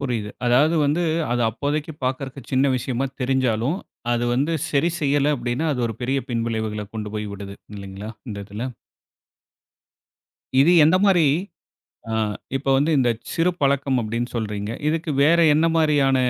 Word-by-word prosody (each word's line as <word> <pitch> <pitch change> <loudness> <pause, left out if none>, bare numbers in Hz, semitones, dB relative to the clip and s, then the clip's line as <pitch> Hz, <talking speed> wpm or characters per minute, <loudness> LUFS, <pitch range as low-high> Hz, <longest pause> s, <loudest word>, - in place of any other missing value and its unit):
புரியுது. 115 -6 -2 0.2
அதாவது 145 +7 +4
வந்து 160 +5 +1 0.3
அது 120 0 +1
அப்போதைக்கு 150 +6 -2
பார்க்கறதுக்கு 135 0 -4
சின்ன 130 +2 +3
விஷயமா 130 +1 -2 0.2
தெரிஞ்சாலும், 130 +2 +1 0.4
அது 120 0 0
வந்து 145 +6 +1 0.2
சரி 155 +4 +2
செய்யலை 145 0 +2
அப்படின்னா, 120 +6 -2
அது 125 - -3
ஒரு 110 - -6
பெரிய 135 +3 0
பின்விளைவுகளை 110 -3 -2
கொண்டு 105 -2 -4
போய் 105 0 -3
விடுது 100 0 -8 0.2
இல்லைங்களா? 100 +2 -7 0.2
இந்த 100 - -5
இதில. 110 +5 -5 1.9
இது 165 +6 +6
எந்த 165 +4 +5
மாரி 180 -5 +5 0.9
ஆ - - 0 0.4
இப்ப 135 - -7
வந்து 145 +4 +2
இந்த 125 -2 +3 0.2
சிறு 165 +2 +2
பழக்கம் 140 -2 +2
அப்படின்னு 115 +2 -2
சொல்றீங்க. 105 -2 -3 0.2
இதுக்கு 160 0 -1
வேறு 170 +3 +5
என்ன 160 +2 +3
மாரியான 145 -4 +3
130 Hz, 145 wpm, -22 LUFS, 115-145 Hz, 1.9 s, இது